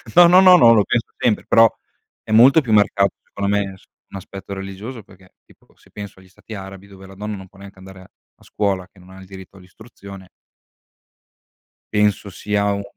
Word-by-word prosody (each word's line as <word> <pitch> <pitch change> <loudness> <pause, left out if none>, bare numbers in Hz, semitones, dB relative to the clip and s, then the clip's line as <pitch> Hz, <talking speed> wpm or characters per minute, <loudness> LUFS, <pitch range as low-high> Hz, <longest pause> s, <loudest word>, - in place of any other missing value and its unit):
No, 175 0 +8
no, 180 +2 +6
no, 185 -1 +7
no, 115 -7 +6
lo 105 -3 +3
penso 115 +3 -2
sempre 110 -4 0
però 115 0 +5 0.5
è - - -10
molto 125 +8 +6
più 125 -6 -5
marcato 100 -2 +2
secondo 100 0 -5
me 100 -1 -1
as 95 - -19 0.3
un - - -9
aspetto 100 +1 -10
religioso 100 +5 -9
perché 95 -1 -21
tipo - - -26
se - - -26
penso 100 -2 -10
agli 95 0 -20
stati 100 +4 -14
arabi 95 -1 -10
dove 95 -1 -15
la 95 - -15
donna 105 +2 -6
non 95 -1 -11
può 95 - -21
neanche 100 -1 -14
andare 95 0 -14
a 95 - -17 0.3
a - - -22
scuola 95 -3 -3
che 95 - -24
non 90 0 -19
ha 95 0 -14
il 95 - -13
diritto 95 0 -14
all'istruzione 95 0 -14 1.7
penso 105 -1 0
sia 100 +1 -2
un 100 0 -5
100 Hz, 205 wpm, -19 LUFS, 95-105 Hz, 1.7 s, No